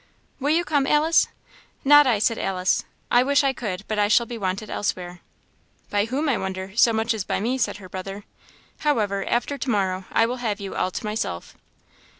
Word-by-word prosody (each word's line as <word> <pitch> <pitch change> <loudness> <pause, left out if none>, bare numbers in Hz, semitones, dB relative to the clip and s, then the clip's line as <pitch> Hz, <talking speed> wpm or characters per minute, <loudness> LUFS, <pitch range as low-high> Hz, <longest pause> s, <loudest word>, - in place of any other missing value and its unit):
"Will 285 +2 -1
you 335 +3 +2
come, 285 -3 +1
Alice?" 310 +2 +4 0.6
"Not 290 0 +7
I," 235 -4 +3
said 220 +2 +1
Alice, 185 -1 0 0.3
"I 245 - +6
wish 280 +2 +3
I 270 -1 +2
could, 205 -6 -4
but 215 -1 -2
I 205 - +3
shall 235 +3 +4
be 235 - -7
wanted 195 0 -3
elsewhere." 180 -3 -3 0.7
"By 205 0 +2
whom, 270 +7 -2
I 255 -7 +1
wonder, 190 +1 -5
so 235 +1 +5
much 225 +1 0
as 215 -3 -3
by - - -2
me?" 245 +6 -1
said 235 - 0
her 195 -2 -11
brother. 195 +2 -7 0.6
"However, 210 -9 0
after 275 +4 -1
to 255 - -3
morrow 190 -4 0
I 225 - +4
will 245 +2 -3
have 220 -4 -2
you 195 -1 -6
all - - 0
to 185 - -6
myself." 210 - -4
220 Hz, 200 wpm, -24 LUFS, 195-255 Hz, 0.7 s, Not